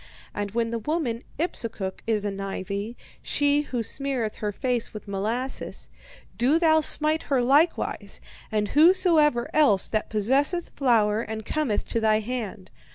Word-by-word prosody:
And 205 0 -3
when 230 +2 -1
the 230 - -2
woman 245 -2 -2 0.2
Ipsukuk 225 - -3
is 215 -2 0
anigh 195 -1 -4
thee, 200 +4 -5 0.2
she 290 0 +2
who 250 -5 -3
smeareth 260 -3 -3
her 210 -1 -2
face 240 +1 -2
with 215 - -8
molasses, 220 +7 -4 0.5
do 265 +6 +4
thou 315 -2 +4
smite 310 +1 +3
her 275 -3 +3
likewise, 290 +7 +1 0.3
and 210 -1 0
whosoever 310 -5 +4
else 275 -11 +4
that 215 - -1
possesseth 275 - +1
flour 225 -5 +2
and 220 -2 -6
cometh 295 -8 -1
to 230 - 0
thy 215 -1 +3
hand. 215 -5 -5
235 Hz, 145 wpm, -25 LUFS, 210-290 Hz, 0.5 s, do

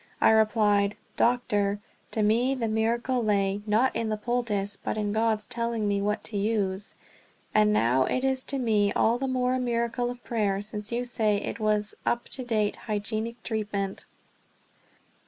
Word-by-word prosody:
I - - +5
replied: 210 -2 +3 0.2
"Doctor, 205 -4 +1 0.3
to 220 - 0
me 240 +6 +3
the 235 -3 -1
miracle 235 +3 0
lay, 200 -1 +1
not 225 +5 +2
in 225 - -1
the 215 - -1
poultice, 210 -3 -1
but - - -4
in 205 -1 -1
God's 220 -1 +1
telling 235 -2 -2
me 200 -1 +1
what 210 +1 -1
to 210 - -4
use; 200 -2 -1 0.6
and 210 0 +4
now 130 - +3
it 255 - -1
is 265 -1 +1
to 275 - -2
me 215 -5 +2
all 235 +2 +2
the 270 - -1
more 255 -1 +1
a 255 - 0
miracle 240 0 -1
of 245 0 -8
prayer, 205 -4 0
since 210 +1 -5
you 240 +1 -1
say 220 -3 +1
it 200 - -4
was 210 -1 +1
up 240 - -1
to 260 - -4
date 215 -4 0
hygienic 220 +2 -3
treatment." 205 -3 -3
220 Hz, 170 wpm, -27 LUFS, 205-240 Hz, 0.6 s, I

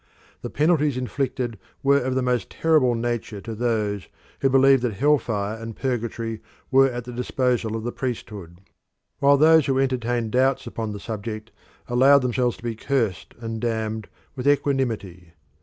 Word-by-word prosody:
The - - -5
penalties 150 -3 +2
inflicted 125 -3 -3 0.2
were 140 +1 +4
of 130 +1 -2
the 130 - +1
most 125 -2 0
terrible 150 -7 +2
nature 115 -2 -3
to 115 - -6
those 105 -5 -1 0.3
who 135 - +2
believed 135 0 +5
that 120 -3 -1
hell 145 +8 +3
fire 105 -2 -3
and 115 0 -8
purgatory 115 -3 -3 0.3
were 135 0 +6
at 120 -1 -5
the 125 - -8
disposal 125 -2 -1
of 110 - -4
the 120 - -2
priesthood, 105 -9 -6 0.6
while 140 0 +5
those 160 0 +5
who 135 -1 +1
entertained 120 -4 0
doubts 130 +2 +2
upon 110 -2 -4
the 105 - -6
subject 110 +1 -6 0.4
allowed 135 +3 +5
themselves 125 -1 0
to - - -18
be 120 -1 -2
cursed 115 -8 -2
and 115 -1 -4
damned 110 -2 -2 0.3
with 130 0 -3
equanimity. 115 - 0
120 Hz, 160 wpm, -24 LUFS, 110-135 Hz, 0.6 s, were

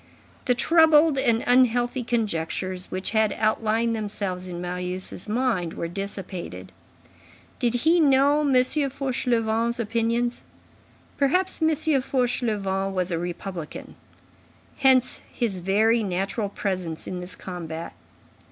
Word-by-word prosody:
The 250 - +3
troubled 315 0 +5
and 235 -4 +2
unhealthy 245 0 +3
conjectures 185 -5 -2
which 185 +1 -3
had 220 -2 +2
outlined 220 +1 +1
themselves 200 -4 -4
in 175 -1 -6
Marius' 180 +2 -4
mind 215 -8 0
were 170 - -3
dissipated. 195 0 -6 0.9
Did 240 -2 +1
he 340 +2 +5
know 285 -1 +4
M. 295 -2 +1
Fauchelevent's 250 -4 +1
opinions? 235 +2 0 0.8
Perhaps 360 +7 +1
M. 320 - +4 0.3
Fauchelevent 210 -7 -1
was 185 0 0
a 165 - -1
republican. 175 -1 -6 0.8
Hence 260 -2 +3
his 215 -7 -1
very 215 +6 +2
natural 195 +2 -2
presence 185 -5 -3
in 180 - -5
this 180 +1 -7
combat. 170 -2 -7
220 Hz, 110 wpm, -25 LUFS, 185-250 Hz, 0.9 s, troubled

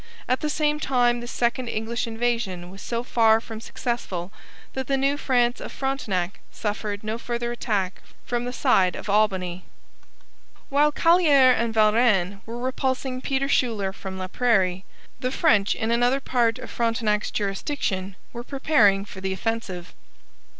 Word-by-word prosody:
At 255 - +1
the 305 - -2
same 300 0 +1
time, 245 -4 +2
this 240 0 -7
second 240 +1 0
English 230 +1 -2
invasion 225 -6 -2
was 195 - -11
so 235 0 -3
far 225 -3 +4
from 225 -1 -9
successful 205 -7 -4 0.4
that 265 -1 -4
the 275 - +1
New 275 +1 +2
France 245 -4 +1
of - - -6
Frontenac 205 -10 -2
suffered 205 -1 -4
no 220 +2 -3
further 240 0 -3
attack 205 -6 -2 0.2
from 240 0 -1
the 245 - -3
side 195 -9 +3
of 205 - -4
Albany. 190 -4 +1 1.1
While 290 +2 +3
Callieres 295 -6 +5
and 230 0 0
Valrennes 215 -3 +3
were 230 +1 -5
repulsing 260 0 -2
Peter 270 0 0
Schuyler 220 -8 +1
from 190 -1 -7
Laprairie, 190 -1 +1 0.3
the 255 -1 -1
French 230 -8 +3
in 220 +1 -1
another 245 +3 +3
part 240 -3 +1
of 255 - -9
Frontenac's 225 -3 0
jurisdiction 195 -2 -2 0.2
were 240 0 -6
preparing 240 -8 +3
for 190 -2 -10
the 190 0 -1
offensive. 190 -3 -4
235 Hz, 150 wpm, -24 LUFS, 200-255 Hz, 1.1 s, Callieres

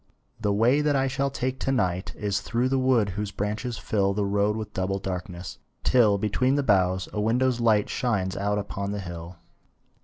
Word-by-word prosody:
The 105 -2 0
way 120 +8 +3
that 150 -1 +2
I 135 0 +2
shall 135 +1 0
take 130 -1 -3
to 135 - -1
night 95 -7 -1
Is 100 -2 -1
through 120 +5 0
the 135 0 +1
wood 125 -5 +3
whose 100 +2 -3
branches 105 +4 -3
fill 100 -2 0
The 105 -1 0
road 100 +2 +1
with 105 -2 -6
double 95 +1 -1
darkness, 90 -2 -6 0.2
till, 110 -5 +4
Between 125 +6 +1
the 145 - +1
boughs, 95 -4 +2
a 105 - -1
window's 120 +3 +2
light 110 -3 +3
Shines 100 -6 -1
out 105 +1 0
upon 100 0 -3
the 105 - -3
hill. 85 -1 -8
105 Hz, 190 wpm, -26 LUFS, 100-125 Hz, 0.2 s, till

